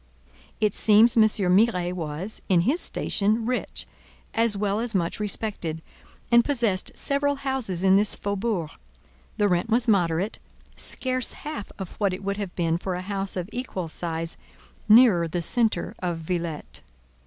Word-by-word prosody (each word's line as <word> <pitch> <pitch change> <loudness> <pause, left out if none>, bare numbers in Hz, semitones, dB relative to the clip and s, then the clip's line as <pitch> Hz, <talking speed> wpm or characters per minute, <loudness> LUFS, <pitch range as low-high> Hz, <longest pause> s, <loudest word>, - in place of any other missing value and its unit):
It 210 -2 +2
seems 220 +2 +5
M. 225 - +6
Miret 195 -3 +2
was, 170 +4 -4
in 180 -3 +4
his 280 - +1
station, 215 +3 0
rich, 250 +1 -2 0.5
as 225 -3 +2
well 205 +1 0
as 230 -2 -3
much 170 0 -1
respected, 200 -6 -3 0.5
and 235 0 +6
possessed 230 -10 +1
several 285 0 0
houses 265 -10 -1
in 190 0 +5
this 205 +1 +2
faubourg; 200 -5 -2 0.7
the 205 - +3
rent 180 +3 0
was 235 +2 +3
moderate, 180 -2 +1 0.4
scarce 255 -1 -2
half 295 -9 -7
of 190 -3 -6
what 200 -3 +1
it 195 - -11
would 200 0 -2
have 200 -4 -5
been 165 -1 0
for 185 0 -3
a 180 - -5
house 195 0 -2
of 180 -1 -3
equal 245 -8 -4
size 165 0 -4 0.5
nearer 215 -7 +6
the 170 +1 -3
centre 230 +4 +1
of 175 -2 -2
Villette. 165 -1 -5
200 Hz, 155 wpm, -25 LUFS, 175-230 Hz, 0.7 s, M